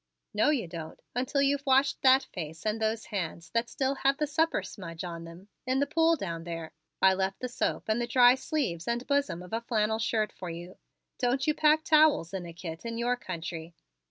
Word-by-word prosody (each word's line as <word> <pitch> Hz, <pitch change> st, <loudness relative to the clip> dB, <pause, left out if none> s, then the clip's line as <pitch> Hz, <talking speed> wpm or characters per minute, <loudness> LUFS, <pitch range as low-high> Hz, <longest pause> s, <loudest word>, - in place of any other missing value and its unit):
"No, 215 Hz, +7 st, +3 dB
you 265 Hz, -, +1 dB
don't, 165 Hz, -2 st, -8 dB
until 260 Hz, +3 st, +1 dB
you've 280 Hz, 0 st, +1 dB
washed 270 Hz, 0 st, +3 dB
that 265 Hz, 0 st, +6 dB
face 160 Hz, -1 st, -6 dB
and 215 Hz, +1 st, -1 dB
those 220 Hz, 0 st, 0 dB
hands 170 Hz, -3 st, -4 dB
that 230 Hz, +1 st, 0 dB
still 265 Hz, 0 st, 0 dB
have 275 Hz, 0 st, +3 dB
the 305 Hz, -, +1 dB
supper 320 Hz, +3 st, +1 dB
smudge 170 Hz, -5 st, -8 dB
on 170 Hz, -2 st, -6 dB
them, 170 Hz, +4 st, -12 dB, 0.2 s
in 260 Hz, +1 st, +2 dB
the 285 Hz, -, +3 dB
pool 325 Hz, +3 st, +3 dB
down 170 Hz, -, -5 dB
there. 165 Hz, -1 st, -6 dB, 0.3 s
I 190 Hz, 0 st, +7 dB
left 190 Hz, 0 st, -1 dB
the 250 Hz, -, -3 dB
soap 245 Hz, -, -1 dB
and 220 Hz, +2 st, +1 dB
the 240 Hz, -, -1 dB
dry 245 Hz, 0 st, +7 dB
sleeves 260 Hz, -, -2 dB
and 235 Hz, +1 st, -1 dB
bosom 280 Hz, -11 st, 0 dB
of 180 Hz, -, -12 dB
a 225 Hz, -, 0 dB
flannel 220 Hz, -2 st, 0 dB
shirt 220 Hz, -1 st, 0 dB
for 180 Hz, -, -7 dB
you. 175 Hz, +2 st, -8 dB, 0.4 s
Don't 255 Hz, +2 st, +1 dB
you 305 Hz, -, +3 dB
pack 310 Hz, +1 st, +4 dB
towels 305 Hz, -, +4 dB
in 180 Hz, -3 st, -4 dB
a -, -, -7 dB
kit 165 Hz, -1 st, -8 dB
in 230 Hz, -1 st, -4 dB
your 240 Hz, +1 st, +1 dB
country?" 165 Hz, -5 st, -6 dB
225 Hz, 215 wpm, -29 LUFS, 175-270 Hz, 0.4 s, I